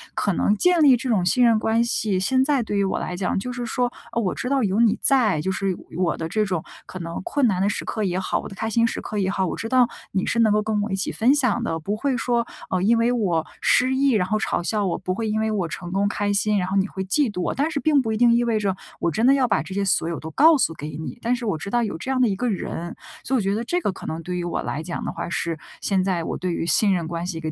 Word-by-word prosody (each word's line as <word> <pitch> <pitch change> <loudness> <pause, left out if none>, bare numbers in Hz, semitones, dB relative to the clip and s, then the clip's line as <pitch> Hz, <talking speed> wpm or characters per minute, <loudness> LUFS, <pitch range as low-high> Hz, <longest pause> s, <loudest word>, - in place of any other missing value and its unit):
可 200 - 0
能 205 +4 +2
建 350 - +3
立 275 -4 +7
这 255 +2 -4
种 200 -6 +2
信 245 +7 +3
任 230 -2 +5
关 225 +1 +2
系 215 -4 0
现 260 +8 +2
在 280 -4 +2
对 210 -2 -3
于 200 - +2
我 195 - -1
来 180 - -4
讲 185 +1 -1
就 250 +6 -4
是 245 -1 -4
说 245 +1 -1 0.2
呃 235 - 0
我 190 -5 -1
知 250 - -3
道 275 -2 +2
有 200 +1 +1
你 230 -3 +4
在。 225 - +3
就 190 - -1
是 190 -1 -1 0.2
我 180 -2 0
的 160 - -3
这 215 +4 +1
种 180 -5 -2 0.2
可 185 - -8
能 170 -1 -5
困 290 -6 +1
难 185 -4 0
的 200 - +2
时 205 - -3
刻 215 - -2
也 185 -2 0
好， 185 - -1
我 - - -7
的 195 - -10
开 220 - -3
心 230 +1 +2
时 - - -3
刻 210 - -5
也 190 -2 +1
好， 190 -1 0
我 - - -3
知 225 - -5
道 250 -1 +4 0.2
你 190 0 -1
是 235 - 0
能 220 -2 +4
够 210 0 +3
跟 210 -1 -1
我 210 - -3
一 - - +1
起 195 - -2
分 240 +5 +3
享 255 -7 +1
的， 165 0 -2
不 200 +7 -3
会 260 +4 -1
说 235 0 0 0.2
呃 185 -1 0
因 230 +4 +3
为 230 +1 +2
我 185 -9 0 0.2
失 260 +1 +3
意， 275 +1 +3
然 200 -6 +1
后 215 +2 +1
嘲 215 - -1
笑 210 +2 0
我； 185 - -1
不 185 - -1
会 225 +1 -2
因 215 +1 0
为 220 0 0
我 195 -5 -1
成 175 +2 -7
功 195 +2 +1
开 205 0 -1
心， 210 +1 +2
然 180 -2 0
后 190 - -2
你 195 0 +2
会 190 - -5
嫉 230 +5 +1
妒 180 - -4
我。 - - -1
但 285 +4 +1
是 305 - -1
并 295 -2 +3
不 225 -3 -2
一 220 - -1
定 240 0 +5
意 240 +1 +3
味 230 -2 +1
着 195 -3 0 0.2
我 170 - +1
真 220 +9 0
的 265 - +6
要 265 -2 +2
把 215 - +1
这 190 - -8
些 200 +1 -1
所 175 -3 +1
有 170 - -4
都 160 - -7
告 315 - +6
诉 165 - +1
给 150 -1 -7
你， 160 - -6
但 240 +2 +1
是 245 -1 -6
我 200 -7 -1
知 160 - -6
道 240 +2 +1
有 205 -7 -3
这 215 - -7
样 265 - 0
的 250 - +5
一 200 - 0
个 245 +5 -1
人。 175 -4 -4 0.3
所 265 - -1
以 - - +3
我 - - 0
觉 195 0 0
得 225 - -2
这 345 +9 0
个 205 - 0
可 190 - -11
能 160 +1 -4
对 180 +2 -4
于 175 - -3
我 175 - -2
来 150 - -3
讲 170 +1 -5
的 - - -2
话 - - -5
是 165 -1 -2 0.2
现 190 -2 +1
在 185 -3 -1
我 - - -3
对 180 -1 -2
于 165 - -2
信 200 +3 +3
任 170 -3 -1
关 170 +1 -4
系 170 -3 -4
的 160 - -5
一 - - -2
210 Hz, 340 characters per minute, -23 LUFS, 185-240 Hz, 0.3 s, 立